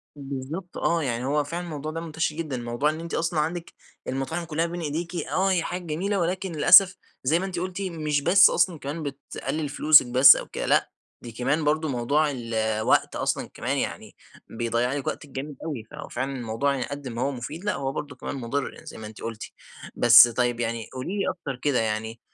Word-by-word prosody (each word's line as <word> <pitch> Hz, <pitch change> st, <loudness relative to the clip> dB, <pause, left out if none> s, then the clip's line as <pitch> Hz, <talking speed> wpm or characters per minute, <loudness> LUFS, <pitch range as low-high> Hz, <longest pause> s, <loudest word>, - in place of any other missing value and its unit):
بالضبط 140 Hz, +6 st, -6 dB
آه، 170 Hz, -1 st, +1 dB
يعني 125 Hz, -2 st, -2 dB
هو 145 Hz, +2 st, +1 dB
فعلًا 170 Hz, +5 st, -5 dB
الموضوع 155 Hz, -2 st, -5 dB
ده 165 Hz, -, -5 dB
منتشر 160 Hz, -1 st, -2 dB
جدًا. 155 Hz, -6 st, -4 dB
موضوع 120 Hz, +4 st, -1 dB
إن 155 Hz, +1 st, -4 dB
أنتِ 170 Hz, 0 st, -7 dB
أصلًا 165 Hz, -1 st, 0 dB
عندِك 165 Hz, +3 st, -3 dB, 0.3 s
المطاعم 135 Hz, +6 st, -3 dB
كلها 160 Hz, +1 st, -1 dB
بين 170 Hz, 0 st, -5 dB
إيديكِ، 165 Hz, +3 st, -4 dB
آه 190 Hz, +2 st, 0 dB
هي 175 Hz, -3 st, +1 dB
حاجة 180 Hz, +2 st, -4 dB
جميلة، 190 Hz, +6 st, -1 dB
ولكن 185 Hz, +2 st, -2 dB
للأسف 185 Hz, +4 st, +7 dB, 0.3 s
زي 155 Hz, +6 st, +2 dB
ما 190 Hz, -, -3 dB
أنتِ 185 Hz, -2 st, -4 dB
قلتِ 185 Hz, +2 st, -4 dB
مش 155 Hz, -6 st, -1 dB
بس 185 Hz, +6 st, +7 dB
أصلًا 170 Hz, -2 st, +1 dB
كمان 145 Hz, +4 st, -5 dB
بتقلِل 140 Hz, +1 st, -4 dB
فلوسك 150 Hz, -1 st, +6 dB
بس 130 Hz, +3 st, +8 dB
أو -, -, -5 dB
كده، -, -, -5 dB
لأ، -, -, +2 dB, 0.3 s
دي 120 Hz, -, -9 dB
كمان 135 Hz, +7 st, -1 dB
برضه 155 Hz, +1 st, +1 dB
موضوع 140 Hz, +4 st, +1 dB
ال 120 Hz, -3 st, -6 dB
الوقت، 110 Hz, 0 st, +1 dB
أصلًا -, -, -1 dB
كمان -, -, -2 dB
يعني -, -, -4 dB, 0.3 s
بيضيع 120 Hz, +2 st, -1 dB
لِك 140 Hz, -2 st, -4 dB
وقتِك 145 Hz, -, -4 dB
جامد 135 Hz, +2 st, -6 dB
أوي 145 Hz, -9 st, -4 dB
فهو -, -, -8 dB
فعلًا 130 Hz, +3 st, -3 dB
الموضوع 125 Hz, +4 st, -1 dB
قد 140 Hz, 0 st, -7 dB
ما 120 Hz, -1 st, -5 dB
هو 140 Hz, +2 st, 0 dB
مفيد، 150 Hz, -, -7 dB
لأ 210 Hz, -, +1 dB
هو 135 Hz, -1 st, -2 dB
برضه 145 Hz, -1 st, -6 dB
كمان 130 Hz, -, -6 dB
مضر 130 Hz, +2 st, -4 dB
زي -, -, -10 dB
ما 110 Hz, -, -7 dB
أنتِ 110 Hz, 0 st, -12 dB
قلتِ، 115 Hz, -1 st, -5 dB, 0.5 s
بس 120 Hz, 0 st, +9 dB
طيب 120 Hz, 0 st, -1 dB
يعني 115 Hz, -1 st, -3 dB
قولي 170 Hz, +11 st, -4 dB
لي 195 Hz, -, +1 dB
أكتر 145 Hz, -7 st, -5 dB
كده 145 Hz, -5 st, +1 dB
يعني 110 Hz, +1 st, -3 dB
145 Hz, 205 wpm, -25 LUFS, 125-165 Hz, 0.5 s, بس